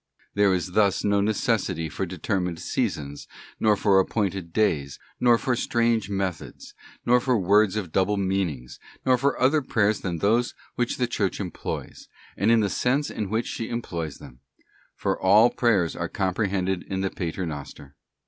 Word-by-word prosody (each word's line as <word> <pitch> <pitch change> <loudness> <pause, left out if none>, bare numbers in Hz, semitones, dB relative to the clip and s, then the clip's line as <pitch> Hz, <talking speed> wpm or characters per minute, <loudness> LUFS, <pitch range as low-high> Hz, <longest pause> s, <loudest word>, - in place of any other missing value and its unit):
There 100 -1 +3
is 90 0 -3
thus 100 0 +2
no 100 -1 +2
necessity 100 -5 0
for 90 +5 -4
determined 90 0 -2
seasons, 70 -2 -3 0.3
nor 105 -2 +3
for 100 -2 +4
appointed 95 -3 -1
days, 75 -9 0 0.2
nor 120 -1 +5
for 125 +1 0
strange 115 -3 +1
methods, 95 -4 -4 0.3
nor 125 +1 +5
for 125 0 +1
words 100 +1 +3
of 95 -6 -3
double 100 +3 +1
meanings, 95 -10 -2 0.3
nor 130 - +5
for 140 +3 0
other 145 +4 +3
prayers 110 -5 +1
than 90 -3 -3
those 115 +7 +1 0.2
which 120 -1 -1
the 125 - +1
Church 110 -5 -2
employs, 95 -4 -6 0.3
and 100 - +1
in 115 -1 +5
the 105 - +1
sense 135 +7 0
in 105 -3 -4
which 110 +3 0
she 115 - -4
employs 85 -10 -4
them; 60 - -14 0.6
for - - -2
all 105 +5 +6
prayers 100 - +1
are - - -3
comprehended 95 -1 -1
in 95 -1 -2
the 95 - -1
Pater 90 +1 -3
Noster. 70 -2 -8
100 Hz, 165 wpm, -25 LUFS, 90-115 Hz, 0.6 s, all